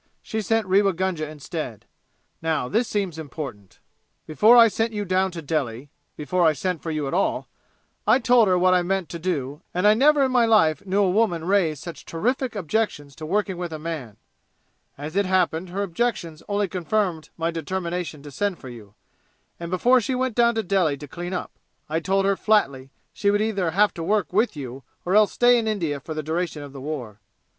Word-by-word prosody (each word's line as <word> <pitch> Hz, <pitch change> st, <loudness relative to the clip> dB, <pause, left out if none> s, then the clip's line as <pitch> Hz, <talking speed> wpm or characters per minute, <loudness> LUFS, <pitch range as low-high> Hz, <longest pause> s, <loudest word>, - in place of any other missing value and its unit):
She 220 Hz, -, -3 dB
sent 225 Hz, +2 st, +1 dB
Rewa 195 Hz, +1 st, +3 dB
Gunga 170 Hz, -3 st, -2 dB
instead. 150 Hz, -, -6 dB, 0.6 s
Now, 160 Hz, -5 st, 0 dB
this 225 Hz, -, +1 dB
seems 190 Hz, -6 st, -2 dB
important: 135 Hz, -, -8 dB, 0.5 s
"Before 215 Hz, +10 st, +5 dB
I 230 Hz, -1 st, +9 dB
sent 225 Hz, +1 st, -1 dB
you 205 Hz, -1 st, -3 dB
down 185 Hz, +1 st, +1 dB
to 170 Hz, -3 st, -8 dB
Delhi 140 Hz, -3 st, -3 dB, 0.3 s
before 175 Hz, +4 st, 0 dB
I 160 Hz, -2 st, +5 dB
sent 180 Hz, +3 st, -3 dB
for 165 Hz, -, -5 dB
you 155 Hz, -3 st, -2 dB
at 135 Hz, -, -4 dB
all 190 Hz, -, 0 dB, 0.6 s
I 220 Hz, +3 st, +6 dB
told 240 Hz, -3 st, +4 dB
her 185 Hz, -1 st, +3 dB
what 185 Hz, +1 st, +4 dB
I 180 Hz, -, +4 dB
meant 185 Hz, -2 st, -1 dB
to 170 Hz, -, -6 dB
do, 150 Hz, -5 st, -3 dB
and 180 Hz, +2 st, +1 dB
I 210 Hz, -, +7 dB
never 285 Hz, +5 st, +4 dB
in 260 Hz, -, +1 dB
my 245 Hz, -2 st, +4 dB
life 160 Hz, -10 st, +3 dB
knew 200 Hz, +2 st, +2 dB
a 190 Hz, -, +2 dB
woman 180 Hz, -6 st, +1 dB
raise 175 Hz, -6 st, +2 dB
such 170 Hz, +3 st, -8 dB
terrific 245 Hz, +8 st, -2 dB
objections 165 Hz, -7 st, -2 dB
to 155 Hz, -, -7 dB
working 195 Hz, 0 st, 0 dB
with 175 Hz, -1 st, -4 dB
a 155 Hz, -, -4 dB
man. 150 Hz, -9 st, -6 dB, 0.8 s
As 150 Hz, +4 st, -7 dB
it 200 Hz, -1 st, +2 dB
happened 180 Hz, -2 st, +1 dB
her 195 Hz, +3 st, -2 dB
objections 175 Hz, -4 st, -2 dB
only 205 Hz, 0 st, +1 dB
confirmed 180 Hz, -2 st, -1 dB
my 165 Hz, 0 st, -1 dB
determination 170 Hz, -2 st, -4 dB
to 145 Hz, -, -10 dB
send 200 Hz, +6 st, -1 dB
for 130 Hz, -, -10 dB
you, 105 Hz, -4 st, -12 dB, 0.6 s
and 170 Hz, 0 st, -6 dB
before 240 Hz, +8 st, +4 dB
she 255 Hz, +4 st, -2 dB
went 255 Hz, -1 st, -1 dB
down 235 Hz, 0 st, +3 dB
to 225 Hz, -, 0 dB
Delhi 180 Hz, -7 st, +1 dB
to 145 Hz, +1 st, -9 dB
clean 175 Hz, +5 st, -6 dB
up 180 Hz, -, -4 dB, 0.4 s
I 160 Hz, +2 st, -1 dB
told 195 Hz, +3 st, +1 dB
her 195 Hz, 0 st, +3 dB
flatly 140 Hz, -12 st, +1 dB, 0.2 s
she 200 Hz, -, +1 dB
would 205 Hz, 0 st, +2 dB
either 205 Hz, -5 st, 0 dB
have 205 Hz, +5 st, +3 dB
to 170 Hz, -, -7 dB
work 205 Hz, +1 st, 0 dB
with 215 Hz, -1 st, +2 dB
you 135 Hz, -1 st, -7 dB, 0.2 s
or 180 Hz, -, 0 dB
else 215 Hz, -1 st, +5 dB
stay 245 Hz, 0 st, +5 dB
in 225 Hz, -, -2 dB
India 165 Hz, -10 st, -1 dB
for 155 Hz, +3 st, -7 dB
the 155 Hz, -, -3 dB
duration 160 Hz, -1 st, -3 dB
of 140 Hz, -1 st, -10 dB
the 135 Hz, -, -8 dB
war." 130 Hz, -8 st, -6 dB
180 Hz, 205 wpm, -24 LUFS, 155-205 Hz, 0.8 s, I